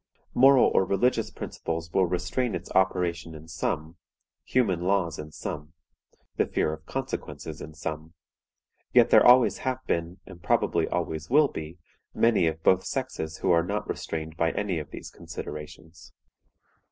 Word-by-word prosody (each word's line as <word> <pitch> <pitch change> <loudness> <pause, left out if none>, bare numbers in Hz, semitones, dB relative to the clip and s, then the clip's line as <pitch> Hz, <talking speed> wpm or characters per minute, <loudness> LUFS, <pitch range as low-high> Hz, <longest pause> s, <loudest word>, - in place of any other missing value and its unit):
Moral 135 +1 +6
or - - +4
religious 100 +7 +1
principles 80 0 -5
will 95 -2 +3
restrain 90 +7 -1
its 85 +1 -7
operations 90 -3 0
in 80 +1 -11
some; 80 0 -3 0.5
human 105 -9 +1
laws 90 -3 0
in 75 0 -7
some; 75 +1 -6 0.6
the - - +2
fear 75 - 0
of 80 0 -10
consequences - - -5
in 80 - -9
some; 80 +1 -6 0.8
yet - - +6
there - - +8
always 125 0 +6
have 130 -1 -1
been, 85 +2 -2
and 90 -3 -13
probably - - +1
always 80 0 -3
will 145 +2 +5
be, 80 +2 -7 0.4
many 115 -7 +3
of 80 0 -3
both 95 0 +4
sexes 100 -12 -4
who - - +1
are 85 -1 +4
not 100 +4 -3
restrained 80 0 -4
by 80 0 +1
any 100 -5 -1
of 75 - -8
these - - -9
considerations. 80 +2 -9
85 Hz, 155 wpm, -27 LUFS, 80-100 Hz, 0.8 s, there